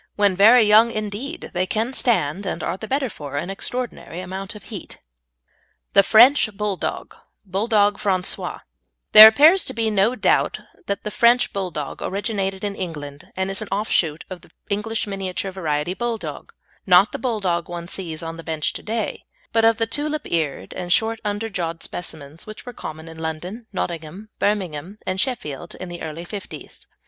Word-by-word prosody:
When 200 -2 +3
very 225 +5 +7
young 215 +2 +6
indeed 220 +9 -5
they 185 +1 0
can 225 +6 -1
stand, 195 - +1
and - - -3
are 170 - -1
the 220 +3 -8
better 270 +2 0
for, 145 - -8
an 175 +6 -3
extraordinary 195 -5 -4
amount 190 +3 -6
of 210 - -11
heat. 195 - -7 1.0
THE 200 - +8
FRENCH 220 0 +5
BULLDOG 210 -3 -3 0.3
(BOULEDOGUE 205 +1 +2
FRANCAIS) 185 -3 +1 0.7
There 215 0 +13
appears 310 +11 +6
to 260 - -5
be 225 -1 0
no 210 +4 +2
doubt - - +2 0.3
that 200 - -2
the 210 - -4
French 240 +3 +3
Bulldog 180 -7 -4
originated 195 -1 -2
in 205 -1 -1
England, 150 -5 -7
and 190 +1 -1
is 195 - -2
an 215 - -5
offshoot 170 -6 0
of 185 -3 -8
the - - -19 0.2
English 220 +2 -1
miniature 195 -1 -4
variety 160 -2 -2
Bulldog, 235 +1 -4 0.4
not 185 +3 +6
the - - -5
Bulldog 190 -9 -1
one 170 -1 -6
sees 170 -4 -5
on 165 0 -6
the 165 - -9
bench 160 -2 -2
to - - -7
day, 220 -1 -3 0.3
but 225 0 +3
of 225 0 +5
the 225 - +1
tulip 300 +5 -2
eared 150 - -2
and 175 -1 -5
short 225 +4 +2
underjawed 200 -6 -3
specimens 160 -2 -7
which 215 - -10
were 245 - -7
common 160 -5 -8
in 160 0 -10
London, 175 +8 -5
Nottingham, 175 +2 -5
Birmingham, 190 -2 -1
and 185 0 0
Sheffield 175 - -4
in 185 - -7
the 175 0 -8
early 160 +2 -6
'fifties. 200 +2 -9
195 Hz, 170 wpm, -22 LUFS, 170-220 Hz, 1.0 s, There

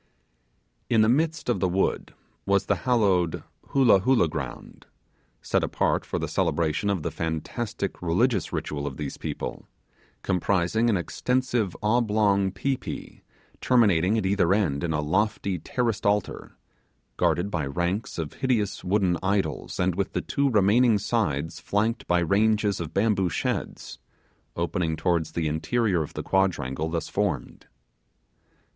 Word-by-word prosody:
In 115 -2 +4
the 110 - +4
midst 160 +5 +1
of 120 - +1
the 95 - +1
wood 95 +2 -1 0.3
was 100 0 +2
the - - +1
hallowed 95 -8 +2 0.2
'Hoolah 125 -8 +5
Hoolah' 115 -2 +3
ground - - -7 0.6
set - - +1
apart - - 0
for - - -2
the - - -2
celebration 85 +4 0
of 95 -6 -1
the - - -2
fantastical 90 +4 -4
religious 100 +3 +1
ritual 70 -1 -3
of 65 - -6
these 70 -2 -5
people - - -5 0.6
comprising 95 +5 +1
an 105 - +2
extensive 120 +2 -1
oblong 105 -3 +2
pi 130 +8 -1
pi, - - -8 0.4
terminating 105 -5 +3
at 110 - -1
either 95 -1 +3
end 80 -10 0
in 85 - -1
a 75 -1 0
lofty 95 +3 0
terraced 115 +2 -1
altar, 105 0 -1 0.6
guarded 95 +4 +1
by 80 -6 -1
ranks 90 +9 -2
of 80 -3 -4
hideous 115 -7 -1
wooden 90 -3 +1
idols, 95 -7 -1
and 90 0 +2
with 95 +2 -2
the - - -1
two 140 0 0
remaining 110 +1 +4
sides 90 - -1
flanked 110 +4 -1
by 90 - +3
ranges 105 +3 +2
of 85 -2 -5
bamboo 100 -1 +1
sheds, - - -3 0.6
opening 85 -1 -1
towards 85 -2 0
the 80 -2 -1
interior 85 +5 0
of 75 - -6
the - - -4
quadrangle 80 -6 0
thus 80 -1 -3
formed. 95 -11 -3
95 Hz, 140 wpm, -26 LUFS, 85-110 Hz, 0.6 s, Hoolah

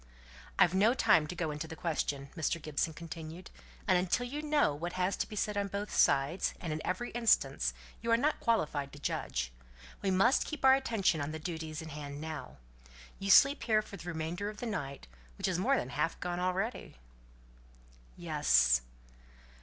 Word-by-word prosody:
"I've 175 - +5
no 210 +6 +4
time 155 -10 +4
to 180 - -6
go 165 -3 -2
into 150 +2 -5
the 160 - -8
question," 145 -4 -2
Mr. 165 +1 -1
Gibson 155 +1 -1
continued. 165 +2 -8 0.4
"And 180 - +5
until 185 +7 0
you 285 +5 -4
know 300 - +2
what 170 +4 -5
has 185 +1 0
to - - -2
be 215 - -7
said 210 0 -1
on 200 0 0
both 200 +1 -4
sides 140 +7 +2
and 165 -3 -3
in 155 - -4
every 185 +7 -2
instance, 235 -1 +2 0.3
you 230 - -4
are 230 - +5
not 295 +5 +1
qualified 150 -11 0
to 145 - -10
judge. 60 - -2 0.5
We 195 - 0
must 195 +8 +4
keep 300 -4 -3
our 265 - +9
attention 225 - +1
on 145 +2 -3
the - - -3
duties 160 -1 -5
in 160 - -8
hand 145 -1 -7
now. 155 -1 -6 0.6
You 195 - -3
sleep 275 +8 +7
here 215 -2 +2
for 205 - -10
the 175 -2 -10
remainder 170 +5 -3
of 210 - -9
the 245 - -5
night, 140 - -4 0.3
which - - -1
is 180 -2 0
more 265 +9 +3
than 125 - -3
half 150 +5 -1
gone 175 0 -3
already?" 185 - -2 1.2
"Yes." - - +3
175 Hz, 185 wpm, -32 LUFS, 155-210 Hz, 1.2 s, our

